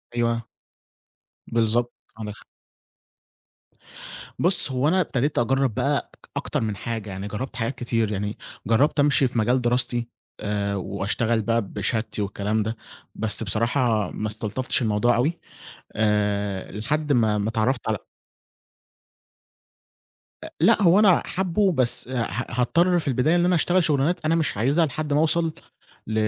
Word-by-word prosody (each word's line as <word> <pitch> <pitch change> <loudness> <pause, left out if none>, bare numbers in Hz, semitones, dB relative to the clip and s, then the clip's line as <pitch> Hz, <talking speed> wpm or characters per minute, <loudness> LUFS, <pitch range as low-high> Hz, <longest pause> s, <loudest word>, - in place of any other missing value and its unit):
أيوه. 115 -1 0 1.0
بالضبط 115 +1 +1 0.2
عندك 105 -2 -6
حق. - - -17 1.9
بُص 175 -5 +4
هو 130 +3 +1
أنا 185 +3 +3
ابتديت 145 -1 -1
أجرّب 135 0 +1
بقى 140 +4 -1 0.3
أكتر - - -2
من 105 -2 -2
حاجة، 115 -2 -5
يعني 95 +2 -5
جرّبت 110 +4 -5
حاجات 120 +3 -2
كتير 115 -3 -1
يعني 105 +1 -3 0.3
جرّبت 140 +7 +2
أمشي 145 -2 +4
في 120 - -5
مجال 125 +4 +2
دراستي 120 0 +1 0.3
آآ 100 -1 -2
وأشتغل 105 +4 -1
بقى 115 +2 +1
بشهادتي 105 +2 -3
والكلام 105 +2 -1
ده 110 +2 -3 0.4
بس 110 0 +1
بصراحة 115 0 +1
ما 110 - -3
استلطفتش 110 +4 -2
الموضوع 110 +2 +2
أوي 150 +8 0 0.6
آآ 105 -2 0
لحد 145 +7 -1
ما 110 -3 +2
ما 105 +2 -1
اتعرّفت 115 +3 0
على 110 -1 0 2.5
أ - - -6
لأ، - - +4
هو 185 +2 +5
أنا 195 -5 +5
حابُّه 190 +1 +1
بس 130 -5 +1
ه 125 -3 -1 0.2
هاضطر 170 +9 +2
في 150 - -4
البداية 135 +6 +2
إن 175 0 +3
أنا 180 0 +3
أشتغل 175 +2 +2
شغلانات 155 +3 +1
أنا 165 +1 +3
مش 155 -10 -1
عايزها 140 +9 +2
لحد 150 +1 -3
ما 150 - +3
أوصل 160 0 +2 0.5
ل 110 - -4
120 Hz, 140 wpm, -24 LUFS, 110-145 Hz, 2.5 s, هو